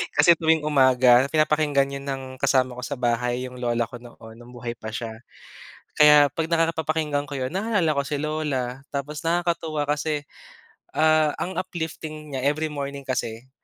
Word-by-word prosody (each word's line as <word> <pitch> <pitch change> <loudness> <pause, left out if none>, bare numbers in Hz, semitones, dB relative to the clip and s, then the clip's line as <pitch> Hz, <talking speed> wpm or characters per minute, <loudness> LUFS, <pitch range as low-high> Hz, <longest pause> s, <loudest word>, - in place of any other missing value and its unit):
Kasi 170 - +7
tuwing 160 -1 +2
umaga 130 -3 +5
pinapakinggan 150 -2 +2
'yon 140 0 -6
ng 135 -1 -3 0.2
kasama 130 -2 +1
ko - - -6
sa 140 - -4
bahay, 125 0 -1
'yong 125 0 -8
lola 120 -1 0
ko 120 +2 -10
noon, 115 -1 -14
no'ng 120 +1 -14
buhay 120 0 -5
pa 110 -2 -10
siya. 110 +1 -5 0.9
Kaya 150 -2 +7
'pag 160 +2 -2
nakaka 165 0 +2
papakinggan 150 -2 -1
ko 145 - -5
'yon 130 +1 -3
naalala 195 -4 +1
ko 140 -1 0
si 150 - -1
lola. 140 -4 -2
Tapos 145 +1 -5
nakakatuwa 165 -3 -1
kasi, 150 0 -1 0.7
uh, 155 -1 +3
ang 185 - -4
uplifting 160 -4 -5
niya. 135 0 -2
Every 155 +2 0
morning 140 -1 -5
kasi 130 -2 -4
145 Hz, 165 wpm, -24 LUFS, 125-155 Hz, 0.9 s, Kasi